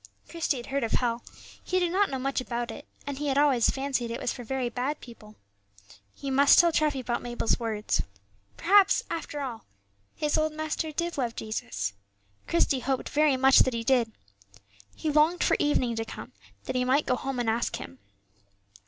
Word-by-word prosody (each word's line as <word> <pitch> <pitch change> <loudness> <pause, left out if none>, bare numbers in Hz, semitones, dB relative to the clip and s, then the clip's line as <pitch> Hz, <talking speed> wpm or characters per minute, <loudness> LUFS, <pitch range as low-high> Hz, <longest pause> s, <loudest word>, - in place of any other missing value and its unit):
Christie 330 -4 -1
had 240 - -7
heard 275 -1 -2
of 225 - -2
hell; 235 -1 0 0.4
he 370 - -1
did 350 -2 0
not 400 +2 +2
know 270 - -3
much 270 0 -1
about 240 -1 -3
it, - - -10 0.2
and 280 -1 -5
he 295 - -2
had 275 -1 +1
always 280 -5 +4
fancied 265 -3 -1
it 235 - -4
was - - -1
for 245 - -8
very 260 +1 -2
bad 255 +5 -2
people. 215 -3 -13 0.8
He 275 - -5
must 280 +1 +6
tell 345 -1 +6
Treffy 300 -4 +1
about 240 -1 -2
Mabel's 240 -1 -1
words. 220 -2 -1 0.6
Perhaps, 390 +3 +5
after 305 -3 -4
all, 240 -5 -5 0.5
his 300 +1 +1
old 310 0 0
master 310 +1 -3
did 340 0 -3
love 240 -3 -1
Jesus. 100 - -4 0.5
Christie 310 -5 +2
hoped 265 0 -2
very 295 -2 +3
much 265 +1 +6
that 255 - +3
he 230 - -2
did. 240 -2 +2 0.8
He 310 - -2
longed 310 +4 +3
for - - +3
evening 255 -5 +1
to 225 - -1
come, - - -9 0.3
that - - -4
he 250 - +2
might 265 +4 +2
go 250 - +1
home 265 +1 -4
and 240 -1 -1
ask 230 +1 0
him. 85 0 -9
265 Hz, 190 wpm, -27 LUFS, 240-300 Hz, 0.8 s, must